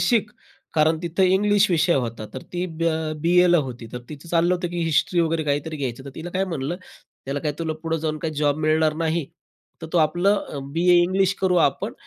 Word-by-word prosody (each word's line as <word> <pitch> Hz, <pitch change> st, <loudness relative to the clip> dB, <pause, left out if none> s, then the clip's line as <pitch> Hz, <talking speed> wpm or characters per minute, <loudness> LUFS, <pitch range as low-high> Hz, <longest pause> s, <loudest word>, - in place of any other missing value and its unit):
शिक" 220 Hz, -4 st, +2 dB, 0.4 s
कारण 155 Hz, +1 st, +3 dB
तिथं 170 Hz, +2 st, 0 dB
इंग्लिश 200 Hz, +2 st, +3 dB
विषय 170 Hz, 0 st, +3 dB
होता. 115 Hz, -4 st, -2 dB
तर 130 Hz, -, -6 dB
ती 180 Hz, 0 st, -2 dB
ब 165 Hz, -2 st, -7 dB, 0.4 s
बीएला 175 Hz, +1 st, +5 dB
होती. 125 Hz, -5 st, -5 dB
तर 125 Hz, -, -4 dB
तिचं 150 Hz, +2 st, -10 dB
चाललं 170 Hz, +2 st, +2 dB
होतं 175 Hz, -1 st, -3 dB
की 175 Hz, 0 st, -4 dB
हिस्ट्री 165 Hz, +2 st, +2 dB
वगैरे 165 Hz, -1 st, +1 dB
काहीतरी 145 Hz, +2 st, -1 dB
घ्यायचं, 135 Hz, -2 st, -4 dB
तर 140 Hz, -, -8 dB
तिला 165 Hz, +5 st, -7 dB
काय 190 Hz, +2 st, 0 dB
म्हणलं, 165 Hz, -2 st, -3 dB, 0.5 s
"त्याला 140 Hz, +1 st, -3 dB
काय 150 Hz, -1 st, -1 dB
तुला 160 Hz, -1 st, -2 dB
पुढे 165 Hz, 0 st, -1 dB
जाऊन 155 Hz, -1 st, -2 dB
काही 160 Hz, -1 st, -4 dB
जॉब 145 Hz, -1 st, +1 dB
मिळणार 155 Hz, 0 st, +3 dB
नाही, 160 Hz, -1 st, -1 dB, 0.6 s
तर 165 Hz, -, -4 dB
तू 175 Hz, -, +3 dB
आपला 175 Hz, +6 st, +3 dB
अ, 145 Hz, -, -6 dB
बीए 175 Hz, +2 st, +4 dB
इंग्लिश 185 Hz, +1 st, +2 dB
करू 185 Hz, -2 st, +2 dB, 0.2 s
आपण," -, -, -6 dB
165 Hz, 205 wpm, -23 LUFS, 150-175 Hz, 0.6 s, बीएला